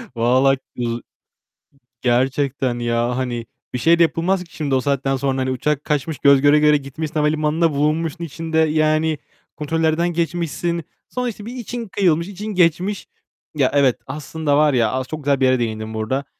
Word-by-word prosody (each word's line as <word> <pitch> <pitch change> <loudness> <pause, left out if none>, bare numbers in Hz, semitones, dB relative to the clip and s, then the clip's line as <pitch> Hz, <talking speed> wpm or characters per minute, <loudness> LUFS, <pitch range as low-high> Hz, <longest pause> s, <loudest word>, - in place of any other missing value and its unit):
Vallahi 130 +4 +3 0.2
uz 120 -1 -2 1.0
gerçekten 130 0 0
ya 120 +1 0
hani 120 -3 -3 0.3
bir - - -1
şey 170 +5 +4
de - - +7
yapılmaz 180 +3 0
ki 165 -4 -18
şimdi 145 -3 -1
o 130 - +2
saatten 135 -1 0
sonra. 135 0 -1
Hani 130 0 -1
uçak 145 +3 -1
kaçmış, 150 -1 -1
göz 140 -1 +5
göre 145 +1 +5
göre 150 0 +5
gitmiş, 145 +3 -6
havalimanına 155 +2 +1
bulunmuşsun 155 +4 -1
içinde, 165 0 -4
yani 155 0 +2 0.4
kontrollerden 160 +2 0
geçmişsin. 170 0 -2 0.3
Sonra 250 -1 -2
işte 210 -2 -9
bir 240 +3 -7
için 240 -1 -5
kıyılmış, 175 -4 +1
için 205 +2 -7
geçmiş. 185 +1 +1 0.5
Ya 135 -3 +2
evet, 140 -4 +4
aslında 150 +1 -1
var 150 -1 +4
ya, 115 -4 +2
as 130 0 -2
çok 155 0 -6
güzel 140 -1 +2
bir 135 - +3
yere 130 -1 +3
değindin 110 -1 -3
burada. 110 +6 -2
150 Hz, 170 wpm, -20 LUFS, 130-165 Hz, 1.0 s, de